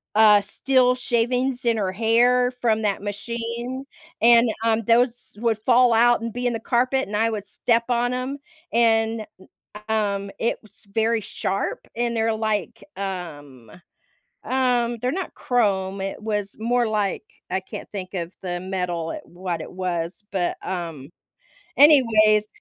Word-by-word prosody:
uh, 210 -1 +7
steel 250 +5 +2
shavings 250 +1 0
in 230 -1 +2
her 190 -3 -1
hair 245 +3 +3
from 230 -3 0
that 205 -2 -1
machine, 235 +5 -5 0.4
and, 235 0 +6
um, 225 0 +2
those 235 0 +1
would 230 -2 +1
fall 245 +1 +4
out 240 +1 +5
and 230 -1 -4
be 245 +1 -4
in - - +1
the 225 - -3
carpet, 255 +3 +1
and 205 - -5
I 225 +1 +2
would 210 -3 -4
step 230 +3 0
on 245 0 +1
'em, 255 +3 -3 0.3
and, 225 -1 +2
n 190 - -17 0.4
um, 200 -2 -1
it 230 - 0
was 215 0 -18
very 225 0 +1
sharp, 195 -1 -3
and 235 0 -1
they're, 225 0 +1
like, 215 -4 -2
um 145 - -7 0.7
um, 245 -2 +1
they're 250 +3 -1
not 375 +1 -4
chrome, 195 -5 0
it 195 +2 -5
was 210 -2 -3
more 240 +1 +1
like, 210 - -1 0.3
I - - 0
can't - - -9
think 190 -2 -7
of 175 0 -4
the 175 -1 -3
metal, 180 -3 -3
what 175 -1 -5
it - - -7
was, 180 0 -3
but, 180 -3 -1
um, 165 -6 -5 0.7
anyways. 220 -8 +6
220 Hz, 150 wpm, -23 LUFS, 195-240 Hz, 0.7 s, uh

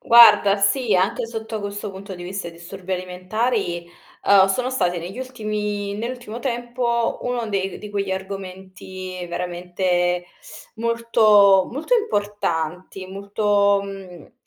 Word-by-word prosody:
Guarda, 230 -4 +7
sì, 205 +3 +2
anche 190 +5 +1
sotto 225 -1 -5
questo 205 +1 -5
punto 195 0 -8
di 175 - -9
vista 185 0 -5
i - - -8
disturbi 180 +3 -8
alimentari, 185 0 -2 0.4
uhm, 195 -1 +7
sono 250 +6 0
stati 180 -9 0
negli 180 +7 -7
ultimi 210 -5 -3
nell'ultimo 235 +1 -5
tempo, 240 -2 -1
uno 245 -2 -2
dei 195 -2 -2
di 210 - -8
quegli 200 -1 -2
argomenti 190 -1 -6
veramente 175 0 -1 0.5
molto 220 -4 +4
molto 305 - 0
importanti, 190 - -2
molto, 200 +1 +1
mhmmm 195 -4 -10
200 Hz, 120 wpm, -22 LUFS, 185-225 Hz, 0.5 s, Guarda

